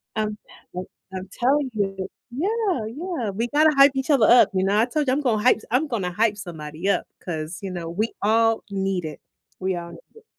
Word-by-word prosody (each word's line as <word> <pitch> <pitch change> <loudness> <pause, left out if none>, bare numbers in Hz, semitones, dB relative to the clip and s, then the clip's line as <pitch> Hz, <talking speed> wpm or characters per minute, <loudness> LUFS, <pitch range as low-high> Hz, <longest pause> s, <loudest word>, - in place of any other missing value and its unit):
I'm 215 -1 -1 0.4
like, 180 +1 -4 0.3
I'm 185 0 -6
telling 265 +1 +2
you 195 -2 -2 0.2
yeah, 375 - 0
yeah. 275 - -4
We 230 +5 -2
gotta 305 +4 +4
hype 275 0 +7
each 265 +3 0
other 260 -7 +5
up, 245 +1 +7
you 185 - +1
know, 195 +2 +2
I 225 - +4
told 285 +3 -1
you 255 - +3
I'm 290 - 0
gonna 225 -6 +1
hype 250 - +5
s - - -14
I'm 280 +5 +2
gonna 200 -9 -2
hype 210 +2 +1
somebody 165 -2 -6
up - - +1 0.2
'cause, 160 -1 -4
you 195 -2 -5
know, 170 -2 -5
we 210 +7 -2
all 225 +2 +3
need 195 -3 -1
it. 155 - -7 0.4
We 190 0 -1
all 170 0 -6
need - - -11 0.2
it. 450 - -17
215 Hz, 220 wpm, -24 LUFS, 190-265 Hz, 0.4 s, hype